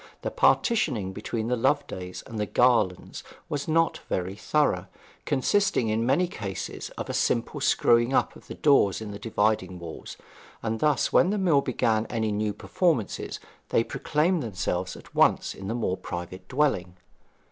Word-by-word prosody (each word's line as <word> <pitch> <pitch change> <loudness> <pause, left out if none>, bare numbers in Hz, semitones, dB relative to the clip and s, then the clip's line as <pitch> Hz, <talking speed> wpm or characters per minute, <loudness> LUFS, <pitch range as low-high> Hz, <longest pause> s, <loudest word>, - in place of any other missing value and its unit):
The - - -2
partitioning 125 - +2
between 110 +2 -3
the 125 - +1
Lovedays 120 -8 -1
and 110 - -6
the 105 - -1
Garlands 120 -8 +1 0.2
was 145 -1 -3
not 165 +1 +2
very 95 +1 -2
thorough, 105 -7 +1 0.4
consisting 135 - +1
in 115 +2 0
many 150 +8 +3
cases 100 - -6
of - - -4
a - - -4
simple - - 0
screwing 120 +1 +3
up - - +1
of - - -15
the - - -7
doors 135 -10 +3
in 110 -2 -6
the 100 - -7
dividing 105 -4 0
walls; 85 -2 -8 0.5
and 110 0 -2
thus 150 -1 +1
when 180 - +5
the 210 - 0
mill 170 -8 +3
began 115 -4 0
any 110 -2 -1
new 105 0 0
performances 125 - -1 0.3
they 115 - +3
proclaimed 160 +8 0
themselves 90 -5 -3
at - - -15
once - - +3
in 95 - -8
the 115 - -2
more 105 -6 -1
private 90 0 -7
dwelling. 125 -11 0
115 Hz, 160 wpm, -26 LUFS, 95-145 Hz, 0.5 s, when